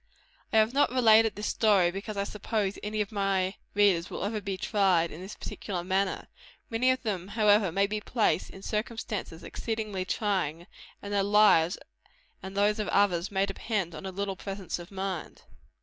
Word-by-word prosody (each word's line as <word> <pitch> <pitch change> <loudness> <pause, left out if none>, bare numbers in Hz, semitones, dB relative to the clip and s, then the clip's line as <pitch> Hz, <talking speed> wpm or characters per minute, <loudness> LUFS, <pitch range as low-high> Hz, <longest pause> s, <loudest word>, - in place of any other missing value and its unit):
I - - +2
have 220 +2 +4
not 285 - +3
related 225 -3 +5
this 210 - -5
story 200 -7 +3
because 200 +3 -6
I 200 - +1
suppose 210 -1 -2
any 210 +1 -2
of 205 - -3
my 195 -2 0 0.2
readers 195 -5 +3
will - - -5
ever 210 0 -2
be 195 -1 -3
tried 185 -5 +2
in 160 - -9
this 190 +3 -8
particular 180 -4 -5
manner. 190 +1 -1 0.4
Many 235 +3 +2
of 255 0 +1
them, 190 -5 -2
however, 205 -2 +3
may 195 +4 +2
be 210 +1 -3
placed 220 -5 0
in 190 - -12
circumstances 210 -6 -4
exceedingly 215 -4 -3
trying; 185 -5 -1 0.4
and 205 0 -5
their 200 - +3
lives 200 -4 +4 0.6
and 190 +1 -8
those 210 +2 +2
of 210 - -1
others 180 -3 +2
may 195 -1 +1
depend 195 -2 -3
on 190 - -7
a - - -4
little 195 +1 -3
presence 195 -1 -5
of 175 - -10
mind. 190 -3 -5
200 Hz, 180 wpm, -28 LUFS, 190-215 Hz, 0.6 s, related